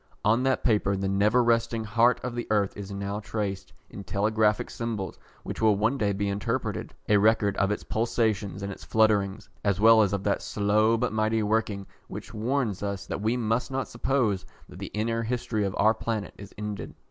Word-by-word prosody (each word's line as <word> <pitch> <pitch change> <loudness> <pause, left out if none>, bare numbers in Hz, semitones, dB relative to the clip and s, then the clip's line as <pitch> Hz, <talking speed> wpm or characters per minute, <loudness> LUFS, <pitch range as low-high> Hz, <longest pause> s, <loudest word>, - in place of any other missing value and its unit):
On 115 +4 +4
that 130 0 +1
paper 105 -4 +2
the 95 0 -1
never 105 +5 +3
resting 115 -1 +1
heart 115 +3 +3
of 125 -1 -3
the 120 0 -4
earth 105 -2 +1
is 100 -1 -7
now 100 +1 -3
tracing, 100 -3 -4 0.2
in 100 - -9
telegraphic 105 +2 +1
symbols 115 -5 -4 0.2
which - - -6
will 110 -2 +5
one 110 +7 +1
day 105 -1 +2
be 100 +1 -1
interpreted, 100 0 -3
a 105 - +5
record 105 -1 +3
of 95 - +2
its 105 - -2
pulsations 110 -3 -1
and 100 - -3
its - - -9
flutterings, 105 -3 +1 0.2
as 100 -2 +1
well 110 +1 +7
as 100 -3 +2
of 100 -1 -2
that 100 - 0
slow 110 +2 +2
but 120 -1 -1
mighty 110 0 +1
working 105 -2 0 0.2
which - - -8
warns 115 -2 -1
us 100 -1 -3
that - - -4
we 110 +3 +1
must 115 +2 0
not 135 -1 -2
suppose 120 -6 0 0.2
that - - -12
the - - -5
inner 115 +2 -1
history 115 -2 -1
of 95 - -3
our 110 +2 +5
planet 110 -2 -3
is 100 0 -11
ended. 105 -2 -5
105 Hz, 195 wpm, -27 LUFS, 100-115 Hz, 0.2 s, well